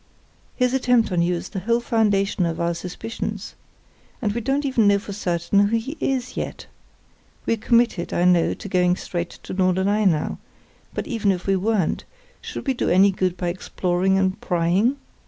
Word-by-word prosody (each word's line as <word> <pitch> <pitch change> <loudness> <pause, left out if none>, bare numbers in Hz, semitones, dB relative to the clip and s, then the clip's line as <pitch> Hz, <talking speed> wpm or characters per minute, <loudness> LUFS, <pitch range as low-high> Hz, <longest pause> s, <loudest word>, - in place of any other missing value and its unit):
His 250 -1 +1
attempt 245 -4 +2
on 175 -2 +2
you 175 +1 +1
is 170 - -6
the 195 - -4
whole 230 +5 +1
foundation 205 -5 +1
of 165 - -3
our 170 0 0
suspicions. 180 +6 -5 0.7
And 215 -5 0
we 235 - -2
don't 275 +4 0
even 240 -6 +3
know 200 0 +5
for 200 0 -7
certain 195 +1 +1
who 230 +2 +1
he 265 +7 -5
is 260 -2 -2
yet. - - -5 0.8
We're 230 - +1
committed, 230 -4 +1
I 175 - +1
know, 175 -2 +3
to 210 - -9
going 180 -2 +2
straight 175 -1 -4
to - - -10
Norderney 190 +3 +2
now; 155 -4 0 0.6
but - - -2
even 220 -5 +1
if 180 -2 -3
we 195 - +2
weren't, 195 -2 0 0.4
should - - -7
we 270 - +1
do 245 - -1
any 195 +3 +5
good 185 -1 -1
by 175 0 -1
exploring 185 +1 0
and 190 -1 0
prying? 180 +9 +1
195 Hz, 180 wpm, -23 LUFS, 180-230 Hz, 0.8 s, know